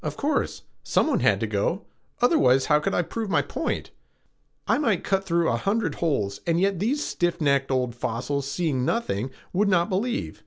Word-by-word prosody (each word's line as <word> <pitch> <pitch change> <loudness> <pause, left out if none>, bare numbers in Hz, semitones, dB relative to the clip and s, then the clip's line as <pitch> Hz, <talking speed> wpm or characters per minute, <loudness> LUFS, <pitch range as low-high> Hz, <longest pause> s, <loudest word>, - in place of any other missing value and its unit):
"Of - - -4
course. 295 0 -1 0.2
Someone - - +1
has - - +3
to - - +1
go; - - -1 0.4
otherwise, 135 - +4
how 150 -1 +4
could 150 - -1
I 175 - +2
prove 220 +4 -4
my - - +2
point? - - -3 0.8
I - - +3
might 225 - +1
cut 195 -1 0
through 170 -2 +1
a 115 - +1
hundred 205 - 0
holes 105 -12 0
and 170 0 +2
yet 195 -1 +1
these 265 +9 0
stiff 175 0 -1
necked 140 -3 +2
old 125 -2 0
fossils, 135 +4 -3
seeing 145 -4 -1
nothing, 130 - -1 0.2
would 200 +3 +2
not 175 0 +2
believe. 230 +6 -2
170 Hz, 185 wpm, -25 LUFS, 135-205 Hz, 0.8 s, otherwise